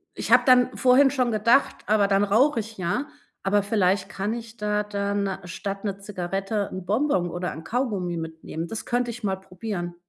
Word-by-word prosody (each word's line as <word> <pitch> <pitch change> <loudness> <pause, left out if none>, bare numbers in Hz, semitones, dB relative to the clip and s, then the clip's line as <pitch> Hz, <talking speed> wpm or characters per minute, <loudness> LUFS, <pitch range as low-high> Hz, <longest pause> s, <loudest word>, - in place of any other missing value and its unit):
ich - - -4
habe - - +8
dann 255 0 +5
vorhin 260 +2 +5
schon 255 -4 +1
gedacht: 230 +5 +3
„Aber 210 -1 +3
dann 200 0 +3
rauche 235 +7 +3
ich 220 +1 -11
ja“, 185 +11 -1 0.4
aber 200 +1 +2
vielleicht 195 -2 +1
kann 200 +2 -2
ich 230 -1 -8
da 210 0 0
dann 200 -1 -2
statt 195 +3 -5
'ne 200 -1 -3
Zigarette 195 +1 -3
'n 185 -1 -6
Bonbon 210 -4 +1
oder 180 +1 -3
'n 160 - -9
Kaugummi 200 -6 -2
mitnehmen. 160 0 -6
Das 225 +5 -6
könnte 245 0 0
ich 235 -1 -10
mal 190 -2 0
probieren. 185 -2 -6
205 Hz, 185 wpm, -25 LUFS, 190-230 Hz, 0.4 s, habe